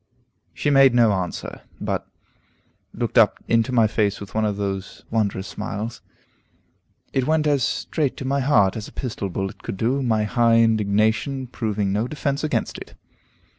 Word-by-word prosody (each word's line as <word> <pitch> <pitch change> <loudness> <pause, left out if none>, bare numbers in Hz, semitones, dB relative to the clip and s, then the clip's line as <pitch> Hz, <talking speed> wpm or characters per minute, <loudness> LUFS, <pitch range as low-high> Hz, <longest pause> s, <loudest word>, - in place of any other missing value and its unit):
She 145 - 0
made 135 -3 +6
no 115 -3 +5
answer, 95 -3 -4 0.2
but - - -3 0.8
looked - - +1
up - - +5
into 115 +2 +2
my 115 -3 +4
face 105 -2 0
with 100 -1 -9
one 110 0 +1
of 105 -1 -1
those 95 -2 -4
wondrous 100 -3 0
smiles. 110 +3 -5 1.1
It 130 -1 0
went 155 0 +2
as 145 -3 +2
straight 145 +3 -1
to 130 - -6
my 140 +1 +1
heart 105 -9 +3
as 110 -2 -5
a - - -12
pistol 115 -6 -4
bullet 95 +1 -4
could - - -5
do, 125 +7 0
my 110 -4 +1
high 115 +2 +3
indignation 110 +4 +2
proving 105 -5 -2
no 105 +4 0
defence 140 0 -2
against 155 - -1
it. - - -11
115 Hz, 165 wpm, -23 LUFS, 105-130 Hz, 1.1 s, made